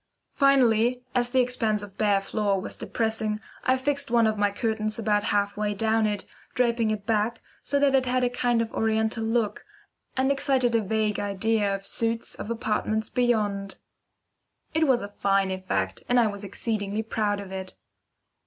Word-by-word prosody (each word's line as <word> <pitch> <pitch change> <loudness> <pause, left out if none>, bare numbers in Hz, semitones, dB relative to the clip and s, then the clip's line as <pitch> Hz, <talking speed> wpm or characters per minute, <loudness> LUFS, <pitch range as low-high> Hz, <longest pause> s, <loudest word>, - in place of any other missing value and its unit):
Finally, 250 -3 +3
as 245 -1 +2
the 255 +1 +3
expanse 225 -4 0
of 200 -2 -10
bare 205 -1 +2
floor 200 0 0
was - - -5
depressing, 220 -2 -2 0.2
I 260 0 +3
fixed 280 +1 -1
one 235 -1 +4
of 215 0 +2
my 205 -1 +2
curtains 215 0 -2
about 210 -2 +1
halfway 205 0 0
down 220 +1 +2
it, 205 -2 -3 0.3
draping 235 -2 +2
it 210 -2 -3
back, 220 0 0 0.2
so 285 - 0
that 280 -1 +3
it 260 -1 +3
had 255 0 +1
a 245 - +3
kind 240 -2 +1
of 225 - -8
oriental 220 0 0
look, 225 -1 0 0.5
and 265 +1 +3
excited 270 -3 +1
a 230 - +3
vague 215 0 0
idea 205 0 0
of 195 0 -8
suites 230 +2 -1
of - - -7
apartments 220 -2 -1
beyond. 210 -6 0 1.0
It 315 0 +2
was 250 -4 +3
a - - -4
fine 195 -1 +1
effect, 95 - -2
and 245 0 +4
I 235 - +5
was 205 -1 -3
exceedingly 205 +1 -2
proud 210 -2 -1
of 195 -2 -8
it. 190 -1 -6
220 Hz, 170 wpm, -26 LUFS, 205-240 Hz, 1.0 s, I